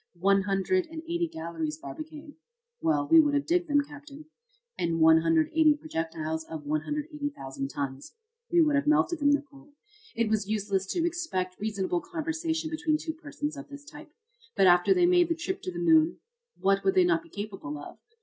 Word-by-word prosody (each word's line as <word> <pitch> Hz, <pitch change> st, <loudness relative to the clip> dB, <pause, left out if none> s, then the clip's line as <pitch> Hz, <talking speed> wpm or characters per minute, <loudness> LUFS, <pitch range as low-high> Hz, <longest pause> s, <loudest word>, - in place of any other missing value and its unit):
"One 195 Hz, +3 st, +3 dB
hundred 200 Hz, -, 0 dB
and 320 Hz, 0 st, -8 dB
eighty 340 Hz, +1 st, -1 dB
galleries, 160 Hz, -2 st, -4 dB
Barbicane." 300 Hz, -, -9 dB, 0.5 s
"Well, 320 Hz, -3 st, +1 dB
we 330 Hz, +1 st, +7 dB
would 295 Hz, -2 st, +3 dB
have 285 Hz, -, 0 dB
digged 350 Hz, +1 st, +1 dB
them, 290 Hz, 0 st, +4 dB
Captain." 290 Hz, 0 st, -12 dB, 0.5 s
"And 165 Hz, -1 st, -1 dB
180 165 Hz, -, +4 dB
projectiles 160 Hz, -, -4 dB
of 160 Hz, -2 st, -8 dB
180,000 285 Hz, -, -3 dB
tons." 135 Hz, -, -6 dB, 0.4 s
"We 345 Hz, -1 st, +5 dB
would 300 Hz, -1 st, +2 dB
have 285 Hz, +1 st, +1 dB
melted 310 Hz, +2 st, +2 dB
them, 285 Hz, -1 st, +3 dB
Nicholl." 285 Hz, 0 st, -2 dB, 0.4 s
"It 230 Hz, -1 st, +1 dB
was 215 Hz, -2 st, 0 dB
useless 200 Hz, -3 st, -1 dB
to 340 Hz, -, 0 dB
expect 320 Hz, -, -3 dB
reasonable 215 Hz, -, -1 dB
conversation 320 Hz, -2 st, -3 dB
between 315 Hz, -1 st, 0 dB
two 320 Hz, +1 st, -5 dB
persons 300 Hz, -1 st, -5 dB
of 285 Hz, 0 st, -9 dB
this 285 Hz, 0 st, -11 dB
type. 300 Hz, +1 st, -12 dB, 0.5 s
But 195 Hz, -, +4 dB
after 175 Hz, -, +5 dB
they 360 Hz, -2 st, +5 dB
made 350 Hz, -1 st, +4 dB
the 335 Hz, -, +1 dB
trip 375 Hz, +4 st, -4 dB
to 370 Hz, -, -4 dB
the 350 Hz, -, -8 dB
moon, 325 Hz, -1 st, +4 dB, 0.4 s
what 195 Hz, 0 st, +2 dB
would 385 Hz, -, +2 dB
they 370 Hz, -, +6 dB
not 350 Hz, -2 st, +2 dB
be 335 Hz, -, -19 dB
capable 195 Hz, -, -6 dB
of? 145 Hz, -, -10 dB
290 Hz, 180 wpm, -28 LUFS, -, 0.5 s, we